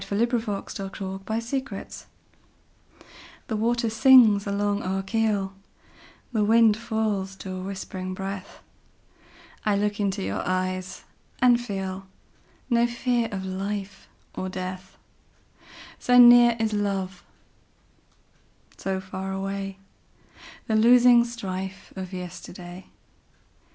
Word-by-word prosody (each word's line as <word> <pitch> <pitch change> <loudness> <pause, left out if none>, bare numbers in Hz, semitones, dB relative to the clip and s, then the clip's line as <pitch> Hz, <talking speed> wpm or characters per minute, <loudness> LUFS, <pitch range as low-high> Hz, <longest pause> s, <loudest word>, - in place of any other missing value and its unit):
1900. 200 -3 -3
By 220 +2 -2
SophieJewett 235 +4 -2
1502 - - -6
Armistice - - -9 1.4
THE 220 - -3
WATER 235 +2 +1
sings 225 -4 +6
along 205 +1 0
our 190 +1 -2
keel, 205 -2 0 0.8
The 215 -2 +2
wind 225 0 +5
falls 215 -4 -2
to 190 0 -8
a 185 - -5
whispering 185 -1 -5
breath;I 195 +1 -8
look 205 +1 -1
into 200 -1 -1
your - - -2
eyes 185 0 -2 0.4
and 245 -1 +5
feelNo 195 +3 -4
fear 240 -1 0
of 190 -2 -4
life 195 +1 -5 0.3
or 185 - -4
death; 185 0 -7 1.0
So 245 0 +3
near 240 -1 +8
is 220 -1 0
love, 195 -2 -2 1.5
so 190 -1 -2
far 190 0 -6
awayThe 195 0 -4 1.1
losing 240 0 +7
strife 190 -5 -6
of 190 -1 -6
yesterday. 180 0 -9
200 Hz, 100 wpm, -25 LUFS, 190-225 Hz, 1.5 s, near